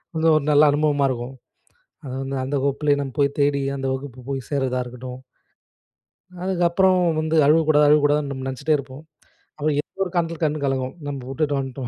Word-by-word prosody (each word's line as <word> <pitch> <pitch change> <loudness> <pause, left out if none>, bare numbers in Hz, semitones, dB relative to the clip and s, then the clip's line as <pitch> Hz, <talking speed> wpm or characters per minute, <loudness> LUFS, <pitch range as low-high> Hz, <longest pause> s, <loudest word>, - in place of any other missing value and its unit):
வந்து 160 0 +1
ஒரு 155 - +2
நல்ல 145 0 +6
அனுபவமா 145 -1 +2
இருக்கும். 125 +1 -4 0.7
அது 130 -2 -6
வந்து 135 0 -4
அந்த 140 +2 -2
வகுப்பிலேயே 145 +1 +1
நம்ம 135 -2 -4
போய் 140 0 +1
தேடி 140 0 +2 0.2
அந்த 135 -1 -3
வகுப்பு 130 -1 -6
போய் 135 -1 -2
சேர்றதா 130 -3 0
இருக்கட்டும். 125 +1 -9 1.2
அதுக்கப்புறம் 185 0 +2 0.2
வந்து 155 +1 -1
"அழுவக்கூடாது, 150 -1 +4
அழுவக்கூடாதுன்னு" 145 -1 +3
நம்ப 130 -1 -6
நெனைச்சிட்டே 140 +4 0
இருப்போம். 140 +1 -9 0.5
அப்புறம் 150 -1 0
எதோ 195 - -11
ஒரு 180 - -6
காரணத்துக்காக 165 -1 0
கண்ணு 150 -1 -3
கலங்கும். 130 -1 -2
"நம்ப 140 -2 -5
வுட்டுட்டு 145 +1 -1
வந்துட்டோம் 130 -2 -5
145 Hz, 165 wpm, -22 LUFS, 135-155 Hz, 1.2 s, நல்ல